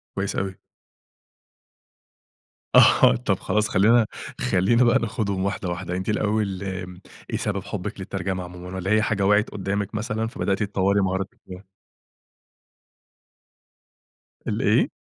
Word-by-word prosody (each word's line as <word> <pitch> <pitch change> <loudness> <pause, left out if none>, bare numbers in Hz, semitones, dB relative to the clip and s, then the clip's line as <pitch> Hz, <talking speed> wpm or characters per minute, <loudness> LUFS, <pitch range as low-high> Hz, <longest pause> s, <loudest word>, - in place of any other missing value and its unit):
كويس 100 0 -2
أوي. 95 -1 -2 2.2
آه - - +7
طَب 105 -6 -1
خلاص 105 0 0
خلّينا 110 +5 +4 0.4
خلّينا 115 +7 +3
بقى 120 +2 +4
ناخدهم 105 -5 -2
واحدة، 100 -2 -2
واحدة. 90 0 -4
أنتِ 95 +2 -3
الأول 105 -2 0 0.7
إيه - - -1
سبب - - -2
حُبك - - -5
للترجمة 95 -1 -3
عمومًا، 90 +1 -9
والَّا 95 +2 -2
هي 110 0 +4
حاجة 105 -2 0
وقعت 105 +2 +3
قدّامك 100 +1 -3
مثلًا 110 0 -2
فبدأتِ 100 -3 -1
تطوري 100 0 +1
مهاراتِك 95 0 -2
فيها؟ 90 +1 -9 2.8
الإيه؟ - - +2
100 Hz, 115 wpm, -24 LUFS, 95-105 Hz, 2.8 s, آه